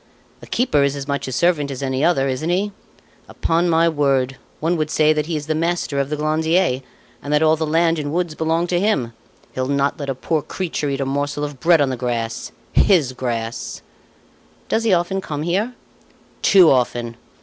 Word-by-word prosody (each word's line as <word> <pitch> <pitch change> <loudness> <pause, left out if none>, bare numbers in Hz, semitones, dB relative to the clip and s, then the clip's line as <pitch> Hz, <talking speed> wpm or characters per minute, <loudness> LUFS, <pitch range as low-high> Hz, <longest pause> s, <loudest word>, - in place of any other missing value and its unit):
A - - -12
keeper 235 - +1
is 140 0 +1
as 140 -1 -6
much 140 -1 -2
a - - -4
servant 150 +1 +1
as 135 0 -5
any 130 +1 -1
other, 155 -5 +3
isn't 135 +5 -2
he? 195 +4 0 0.6
Upon 170 +2 0
my 165 0 +4
word, 135 -4 +1 0.2
one 165 +3 +1
would 155 -2 -1
say 155 0 +3
that 150 0 -2
he 165 - -2
is 150 -1 -3
the 155 - 0
master 165 -3 -1
of 140 0 -1
the 150 - -1
Glandier, 155 -1 +1 0.4
and 145 - -6
that 150 +1 +3
all 155 0 +5
the 160 0 -2
land 165 +1 +2
and 145 -1 -3
woods 170 -1 -1
belong 160 +2 0
to 175 0 0
him. 155 - 0 0.4
He'll 130 0 -2
not 140 +1 0
let 140 -1 -4
a 135 - -1
poor 155 +4 -1
creature 160 -3 -3
eat 140 0 -2
a - - 0
morsel 145 +2 -2
of 145 -3 -5
bread 165 0 +4
on 135 -2 +2
the 130 - -3
grass 115 -2 -3 0.2
his 155 -10 +3
grass!" 115 -3 -4 0.9
"Does 225 - +1
he 220 - +3
often 175 +3 -1
come 150 -4 -4
here?" 200 +9 -1 0.7
"Too 185 -5 +6
often. 120 -2 0
150 Hz, 205 wpm, -20 LUFS, 135-170 Hz, 0.9 s, Too